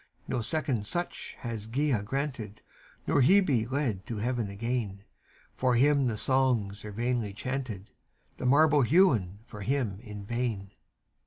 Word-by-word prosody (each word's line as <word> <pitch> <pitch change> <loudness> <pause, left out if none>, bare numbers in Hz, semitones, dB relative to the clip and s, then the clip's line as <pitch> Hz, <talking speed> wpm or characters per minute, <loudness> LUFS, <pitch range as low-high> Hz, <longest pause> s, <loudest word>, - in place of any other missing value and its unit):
No 125 - -1
second 120 -5 -2
such 175 +7 -4
hath 110 -3 -5
Gaea 135 -3 +1
granted, 120 -4 -4 0.5
Or 145 - +3
Hebe 135 - +4
led 130 -9 -1
to 115 - -4
Heaven 120 -1 -1
again; 105 -1 -3 0.5
For 125 -1 +2
him 140 +1 +4
the 110 -3 -1
songs 120 -6 +1
are 105 - -6
vainly 115 -1 -1
chanted, 120 -4 -4 0.5
The 125 - -2
marble 145 +2 +5
hewn 120 - +3
for 105 -3 -10
him 115 -4 -1
in 105 -3 -9
vain. 115 -4 -2
120 Hz, 140 wpm, -29 LUFS, 105-135 Hz, 0.5 s, marble